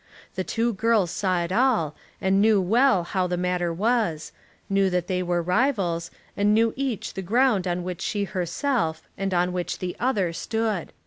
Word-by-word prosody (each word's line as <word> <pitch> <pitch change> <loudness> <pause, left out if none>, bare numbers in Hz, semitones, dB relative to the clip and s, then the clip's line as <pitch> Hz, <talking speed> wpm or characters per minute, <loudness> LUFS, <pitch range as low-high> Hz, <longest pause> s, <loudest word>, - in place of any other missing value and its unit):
The 185 - -2
two 230 +4 0
girls 210 -3 +2
saw 185 -3 0
it 170 - -5
all 215 - +2 0.2
and 190 +1 +2
knew 215 -1 +5
well 220 +1 +3
how 185 +1 -1
the 180 0 -2
matter 180 -1 0
was, 190 -4 0 0.4
knew 195 -1 +2
that 180 -2 0
they 185 0 -1
were 175 -1 0
rivals, 180 -5 0 0.3
and 205 +1 +3
knew 225 0 +3
each 260 -5 -3
the 190 - -4
ground 210 0 +2
on 175 0 -1
which 180 -1 -5
she 205 -1 -1
herself 180 - -1
and 195 0 -2
on 180 0 +1
which 180 -1 -3
the 180 -1 -4
other 205 -9 0
stood. 220 0 -2
190 Hz, 180 wpm, -25 LUFS, 175-225 Hz, 0.4 s, knew